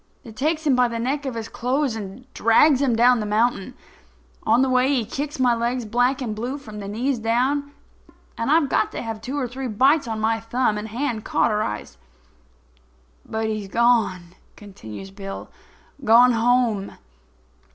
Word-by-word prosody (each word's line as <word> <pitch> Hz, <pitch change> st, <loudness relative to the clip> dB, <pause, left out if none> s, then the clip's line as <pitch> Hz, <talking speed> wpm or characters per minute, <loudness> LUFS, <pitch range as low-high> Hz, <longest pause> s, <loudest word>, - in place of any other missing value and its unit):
I 230 Hz, -, -9 dB
takes 310 Hz, +7 st, -1 dB
him 280 Hz, -4 st, +4 dB
by 250 Hz, 0 st, +4 dB
the 235 Hz, -1 st, -4 dB
neck 270 Hz, +5 st, -2 dB
of 255 Hz, -, -4 dB
his 225 Hz, -1 st, -5 dB
clothes 255 Hz, +1 st, -1 dB
and 210 Hz, +3 st, -8 dB
drags 260 Hz, +5 st, +4 dB
him 255 Hz, -5 st, +2 dB
down 245 Hz, +1 st, +4 dB
the 215 Hz, -, -3 dB
mountain. 215 Hz, -1 st, 0 dB, 0.7 s
On 255 Hz, -, +4 dB
the -, -, +2 dB
way 255 Hz, +1 st, +3 dB
he 260 Hz, -6 st, +1 dB
kicks 285 Hz, +6 st, -5 dB
my 250 Hz, -2 st, +4 dB
legs 235 Hz, +1 st, -1 dB
black 245 Hz, +5 st, +1 dB
and 215 Hz, -3 st, -3 dB
blue 245 Hz, +6 st, -4 dB
from 215 Hz, -7 st, -10 dB
the 200 Hz, -, -6 dB
knees 240 Hz, +5 st, -1 dB
down; 260 Hz, +6 st, 0 dB, 0.6 s
and 230 Hz, -, -3 dB
I've 310 Hz, -1 st, +4 dB
got -, -, +1 dB
to -, -, -4 dB
have 225 Hz, -2 st, -5 dB
two 265 Hz, +5 st, -4 dB
or 265 Hz, -3 st, -1 dB
three 260 Hz, +2 st, -5 dB
bites 265 Hz, +6 st, +3 dB
on 220 Hz, -1 st, -3 dB
my 225 Hz, +1 st, +1 dB
thumb 225 Hz, -1 st, 0 dB
and 210 Hz, -, -6 dB
hand 230 Hz, -1 st, -3 dB
cauterized. 105 Hz, -, -1 dB, 1.3 s
"But 220 Hz, 0 st, -2 dB
he's 215 Hz, -2 st, -3 dB
gone"—continues 195 Hz, -, -2 dB
Bill—"gone 230 Hz, +5 st, 0 dB
home. 230 Hz, -3 st, +1 dB
235 Hz, 165 wpm, -23 LUFS, 215-260 Hz, 1.3 s, him